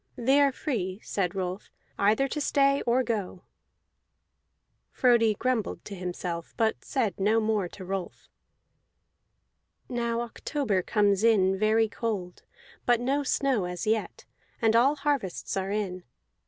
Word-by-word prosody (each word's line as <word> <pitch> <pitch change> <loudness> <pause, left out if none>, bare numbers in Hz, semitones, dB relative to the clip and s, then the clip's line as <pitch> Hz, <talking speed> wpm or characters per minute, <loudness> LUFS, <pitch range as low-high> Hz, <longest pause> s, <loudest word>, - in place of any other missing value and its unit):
"They 265 +4 +3
are 280 -1 +4
free," 205 - -3
said 190 -2 -2
Rolf, 185 0 -4 0.3
"either 215 +7 +3
to 300 - -3
stay 275 -1 +3
or 250 +2 +3
go." 205 -6 -3 1.5
Frodi 235 -4 +3
grumbled 250 -2 -2
to 205 - -7
himself, 175 -2 -5
but 220 -1 0
said 225 -9 -1
no 215 +3 +3
more 215 -4 0
to 185 +2 -10
Rolf. 190 -1 -5 1.6
Now 235 -1 -1
October 240 -3 -1
comes 205 0 +2
in 195 -4 +4
very 220 +1 +3
cold, 205 -6 -4 0.5
but 240 -1 +4
no 270 +4 0
snow 270 -7 +1
as 180 -1 -4
yet; 220 0 -1 0.3
and 225 -2 +3
all 265 +5 +5
harvests 280 -10 -2
are 190 0 -2
in. 195 -3 -3
220 Hz, 130 wpm, -27 LUFS, 190-245 Hz, 1.6 s, all